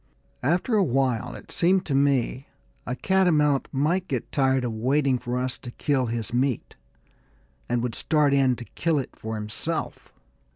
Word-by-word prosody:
After 175 - +1
a 205 - +4
while, 125 -4 0
it - - -12
seemed 185 +2 +2
to 145 - -2
me, 135 -1 +1 0.4
a 125 - -2
catamount 155 -6 +2
might 170 +7 0
get 130 -6 -3
tired 135 -2 +2
of 120 -2 -2
waiting 130 +3 +1
for 120 +1 -3
us 125 0 -2
to 125 - -8
kill 130 +1 0
his 115 0 -4
meat, 130 0 -1 0.9
and 120 -1 0
would 125 -2 -2
start 150 +1 +2
in 135 -2 +3
to 120 - -9
kill 165 +4 -1
it 135 - -4
for 110 0 -5
himself. 105 -1 -4
135 Hz, 165 wpm, -25 LUFS, 125-150 Hz, 0.9 s, a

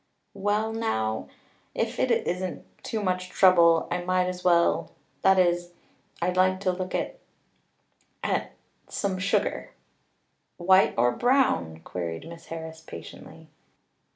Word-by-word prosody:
"Well 210 +2 0
now 110 - -1 0.5
if - - -2
it - - +2
isn't 180 0 -1 0.2
too 220 -2 -3
much 185 -1 -1
trouble 170 -3 +5
I 180 - -1
might 185 0 +1
as 180 0 -4
well 170 -1 +3 0.3
that 190 0 +5
is 175 -1 +2 0.5
I'd 180 +1 0
like 185 0 +3
to 185 - +2
look 185 0 -4
at - - -3 1.0
at - - -1 0.4
some 195 -2 -2
sugar." 200 +1 0 0.9
"White 185 +2 +4
or 120 +1 +4
brown?" 120 - +1
queried 85 - -5
Miss 165 0 -11
Harris 160 -1 -7
patiently. 85 - -11
180 Hz, 125 wpm, -26 LUFS, 165-190 Hz, 1.0 s, trouble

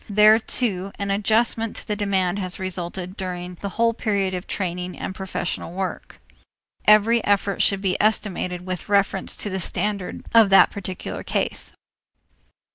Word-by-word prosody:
There, 215 +2 +6
too, 200 -5 -1
an 200 0 -2
adjustment 220 +2 +1
to - - -5
the 210 - -1
demand 195 -2 0
has 185 -1 -2
resulted 185 0 -3
during 180 -2 -5
the 200 - -3
whole 230 0 +3
period 200 -5 -1
of 180 0 -5
training 180 -1 -3
and - - -5
professional 185 -3 -4
work. 190 0 -5 0.7
Every 215 +2 +5
effort 200 0 +1
should 195 -1 +3
be 190 -1 0
estimated 185 -4 -1
with 185 0 -5
reference 200 -1 +1
to 205 - -3
the 190 - -2
standard 195 +1 -3
of 225 -3 +7
the 195 - +8
particular 185 -2 -6
case. - - -2
195 Hz, 150 wpm, -23 LUFS, 185-210 Hz, 0.7 s, the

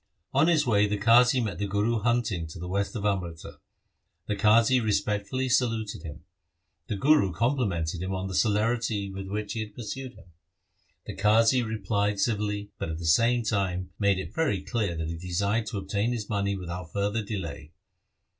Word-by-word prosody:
On 140 +4 +4
his 160 -3 +3
way 105 -3 +3
the 105 0 -1
Qazi 120 +5 +5
met 95 -6 -4
the 100 - -1
Guru 105 +4 +1
hunting 115 -7 0
to 80 - -10
the 90 +1 -6
west 100 +5 -2
of 105 -2 -3
Amritsar. 90 -5 -3 0.7
The 105 - -2
Qazi 115 +4 +4
respectfully 105 +4 0
saluted 115 -4 0
him. 80 0 -9 0.6
The 105 - -2
Guru 140 -3 +4
complimented 90 - -1
him 95 +1 -3
on 95 0 -3
the 95 - -5
celerity 110 0 +1
with 95 0 -6
which 105 +1 -3
he 115 - -4
had 105 -1 -6
pursued 130 +2 -6
him. 90 - -18 0.7
The - - -7
Qazi 110 +5 +4
replied 105 -2 -1
civilly, 105 -2 -1
but - - -3
at 80 - -3
the 85 - -6
same 115 +9 +3
time 95 -4 -1
made 100 -2 +3
it 95 - -6
very 105 - 0
clear 105 -8 -1
that 80 -1 -3
he 85 0 -4
desired 100 +5 -1
to 110 - -4
obtain 100 +4 -1
his 110 -4 -4
money 100 -2 -1
without 90 -2 -6
further 100 +4 -1
delay. 90 -7 -6
105 Hz, 180 wpm, -27 LUFS, 95-115 Hz, 0.7 s, Qazi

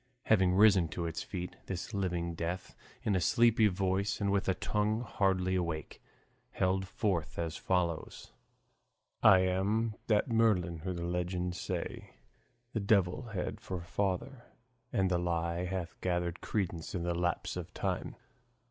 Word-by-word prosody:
Having 95 -4 +4
risen 100 -4 +6
to 85 +2 -4
its 80 -1 -3
feet, 90 -2 -5
this 95 +4 -4
living 90 -3 -1
death, 85 +2 -4 0.3
in 100 - +1
a 90 - +2
sleepy 115 0 +5
voice 95 +1 0
and 100 -1 +1
with 100 -1 +1
a 95 - +2
tongue 105 +3 0
hardly 95 -5 +1
awake, 85 -4 -2 0.5
held 95 0 +1
forth 90 -3 -1
as 85 -1 -2
follows: 85 -3 -1 0.9
I 95 -1 +8
am 100 +5 +1
that 105 -2 +3
Merlin 105 -8 +2
who 90 +3 -3
the 85 -1 -4
legends 90 0 -2
say - - -4 0.6
The 110 - 0
devil 100 +2 +2
had 90 - -3
for 95 - -4
father, 100 +7 -2 0.5
and 95 -1 +1
the 90 - +2
lie 85 0 -1
Hath 90 -2 -4
gathered 85 -1 -1
credence 90 -6 -2
with 85 - -2
the 85 0 0
lapse 90 +1 -1
of - - -6
time. - - -2
95 Hz, 150 wpm, -32 LUFS, 85-100 Hz, 0.9 s, I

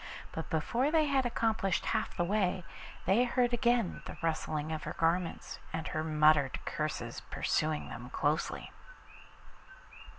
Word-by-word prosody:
But 160 - -5
before 235 - +1
they 315 -1 +4
had 270 -3 +2
accomplished 220 -5 0
half 220 -1 -1
the 175 - +2
way 185 -1 +1 0.4
they 195 +7 +4
heard 245 0 +2
again 240 -4 +2
the - - -8
rustle 155 -1 0 0.2
of 155 - -3
her - - -5
garments 165 +1 -1
and 160 - -3
her 155 - -1
muttered 150 -3 +4
curses 150 -7 -3
pursuing 155 -1 0
them 120 +1 -7
closely. 150 +4 -1
175 Hz, 135 wpm, -32 LUFS, 155-235 Hz, 0.4 s, they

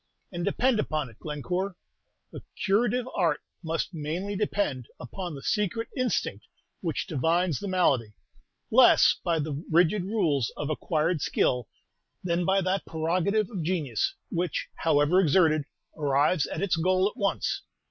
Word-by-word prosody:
And 175 -2 -4
depend 230 +5 +2
upon 150 - -2
it, 110 - -22
Glencore, 180 +6 -3 0.6
the - - -8 0.2
curative 235 +5 +2
art 165 -6 +1 0.2
must 165 +3 -2
mainly 170 +6 -3
depend 200 - -1
upon 175 +6 -6
the 135 - -9
secret 210 +3 -1
instinct 255 -3 -1 0.3
which - - -2
divines 165 +1 +1
the 205 - -5
malady, 135 - +1 0.6
less - - +6
by 170 -1 +1
the 150 0 -3
rigid 175 +4 +3
rules 165 - +1
of 150 +1 -2
acquired 155 +1 0
skill 125 -4 +1 0.6
than 175 -1 0
by 195 +2 +3
that 185 +1 -1
prerogative 180 +6 0
of 195 -6 -4
genius, 155 - -1 0.2
which, 175 -1 -2
however 160 +3 +3
exerted, 155 -3 +3 0.3
arrives 145 +2 +2
at - - -4
its 190 -4 +1
goal 185 +3 +2
at 210 - -6
once. 200 -1 -1
170 Hz, 140 wpm, -27 LUFS, 150-195 Hz, 0.6 s, less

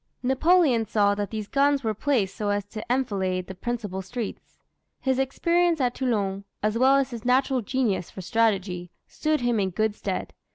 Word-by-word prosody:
Napoleon 265 -1 +4
saw 205 -1 +3
that 205 -1 -3
these 215 -1 -5
guns 280 +1 +2
were 220 -1 0
placed 215 -4 0
so 210 -1 -2
as 205 -1 0
to 215 0 -6
enfilade 190 -8 0
the 190 - -7
principal 205 -2 -4
streets. 225 +3 -6 0.4
His 265 -1 0
experience 335 +5 +2
at 250 -2 +1
Toulon, 200 -7 -1 0.2
as 215 +1 +1
well 260 +3 +5
as 275 -1 +1
his 230 -3 -6
natural 260 +1 +2
genius 220 -5 -1
for 190 - -8
strategy, 190 -3 0 0.2
stood 310 -2 -1
him 240 -2 +1
in 190 -1 +1
good 215 +4 0
stead. - - -4
230 Hz, 175 wpm, -25 LUFS, 200-265 Hz, 0.4 s, well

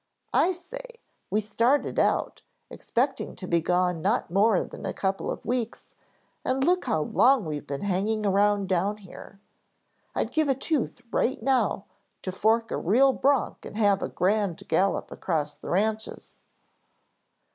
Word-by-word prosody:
I 365 - +4
say, 475 +8 -9 0.3
we 215 - +1
started 230 +7 +1
out, - - +1 0.3
expecting 270 +3 -2
to 185 - -8
be 170 -1 +2
gone 180 0 +1
not 200 0 0
more 200 +1 +3
than - - -10
a - - -3
couple 195 0 -1
of - - -5
weeks 235 0 -3 0.5
and 260 +1 0
look 360 +4 +2
how 155 - +1
long 255 - +3
we've 150 -2 -5
been 140 0 -4
hanging 205 +3 0
around 200 0 +2
down 195 +3 0
here. 195 0 -13 0.8
I'd - - -1
give 315 -2 +1
a 270 - +3
tooth 280 0 -2
right 260 - +1
now 240 -5 +1 0.4
to 185 - -3
fork 225 +4 +1
a - - -1
real 260 +9 +4
bronc 275 -2 +1
and - - -8
have 205 -3 +3
a - - -2
grand 200 -2 0
gallop 185 +4 +1
across 150 -4 -2
the - - -9
ranches." 215 +4 -2
210 Hz, 155 wpm, -26 LUFS, 190-255 Hz, 0.8 s, I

